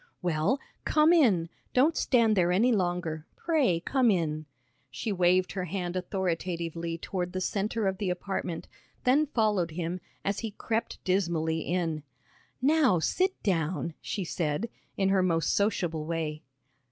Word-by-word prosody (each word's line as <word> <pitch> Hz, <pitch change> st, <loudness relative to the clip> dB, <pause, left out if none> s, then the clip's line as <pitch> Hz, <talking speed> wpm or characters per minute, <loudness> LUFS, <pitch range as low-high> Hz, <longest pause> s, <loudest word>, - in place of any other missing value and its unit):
"Well, 175 Hz, -, +1 dB, 0.2 s
come 310 Hz, +2 st, +4 dB
in. 210 Hz, -, +4 dB, 0.3 s
Don't 290 Hz, +6 st, +4 dB
stand 230 Hz, -4 st, +3 dB
there 175 Hz, -2 st, +3 dB
any 225 Hz, +8 st, +4 dB
longer. 175 Hz, -6 st, -1 dB
Pray 285 Hz, -, +2 dB
come 255 Hz, +5 st, +2 dB
in." 155 Hz, -5 st, 0 dB, 0.4 s
She 135 Hz, -, -3 dB
waved 180 Hz, -1 st, +3 dB
her 185 Hz, -2 st, -3 dB
hand 180 Hz, 0 st, -3 dB
authoritatively 170 Hz, -2 st, -2 dB
toward 180 Hz, +1 st, -3 dB
the 185 Hz, -, -1 dB
centre 205 Hz, +3 st, -1 dB
of 190 Hz, -1 st, 0 dB
the 200 Hz, -3 st, -1 dB
apartment, 180 Hz, -2 st, -3 dB, 0.4 s
then 285 Hz, +5 st, +4 dB
followed 210 Hz, -, +1 dB
him, 170 Hz, +2 st, -3 dB, 0.3 s
as 200 Hz, +1 st, 0 dB
he 225 Hz, -, -3 dB
crept 230 Hz, +1 st, -2 dB
dismally 170 Hz, -4 st, +1 dB
in. 165 Hz, -3 st, -1 dB, 0.6 s
"Now 280 Hz, -, +4 dB
sit 375 Hz, -, 0 dB
down," 170 Hz, -2 st, 0 dB
she 200 Hz, -, -3 dB
said, 165 Hz, +6 st, -2 dB, 0.3 s
in 195 Hz, -1 st, +2 dB
her 195 Hz, -1 st, +3 dB
most 165 Hz, -3 st, +1 dB
sociable 175 Hz, -7 st, 0 dB
way. 160 Hz, -2 st, -2 dB
185 Hz, 140 wpm, -29 LUFS, 165-215 Hz, 0.6 s, come